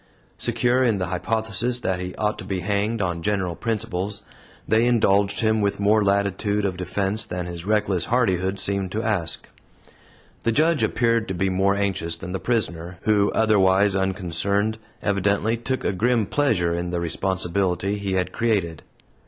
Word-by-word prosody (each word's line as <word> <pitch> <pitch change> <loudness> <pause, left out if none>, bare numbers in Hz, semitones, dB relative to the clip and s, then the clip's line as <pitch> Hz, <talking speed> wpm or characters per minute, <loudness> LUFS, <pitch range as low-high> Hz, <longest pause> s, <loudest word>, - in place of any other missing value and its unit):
Secure 125 +1 +1
in 115 -5 +2
the 90 - -1
hypothesis 110 +5 -1
that 95 -1 -1
he 90 0 -5
ought 105 0 -1
to - - -6
be 95 -2 -3
hanged, 105 +3 0
on 85 -2 -2
general 95 -2 -1
principles, 105 -2 -3 0.4
they 110 +2 +3
indulged 100 -4 +2
him 110 -1 +2
with 100 -1 0
more 105 +1 +3
latitude 100 +1 +1
of 95 -2 -1
defense 95 +4 -2
than 90 0 -4
his 85 0 -7
reckless 105 -4 +1
hardihood 95 -5 +1
seemed 100 -1 -1
to 110 +2 -1
ask. 90 -9 -1 0.9
The 115 - +1
Judge 155 +5 +3
appeared 115 -2 +1
to 95 - -3
be 95 +2 0
more 95 +1 +2
anxious 95 -5 -1
than 85 +2 -7
the 95 - -3
prisoner, 90 -7 -2
who, 105 -2 +3
otherwise 100 -2 +3
unconcerned, 100 +3 -1 0.2
evidently 100 +2 +1
took 120 +3 -3
a - - +1
grim 115 +3 +1
pleasure 100 -11 +1
in 85 +1 -2
the 90 -1 -2
responsibility 95 +2 -1
he 100 -1 -2
had 90 -1 0
created. 100 -9 0
100 Hz, 160 wpm, -23 LUFS, 90-110 Hz, 0.9 s, they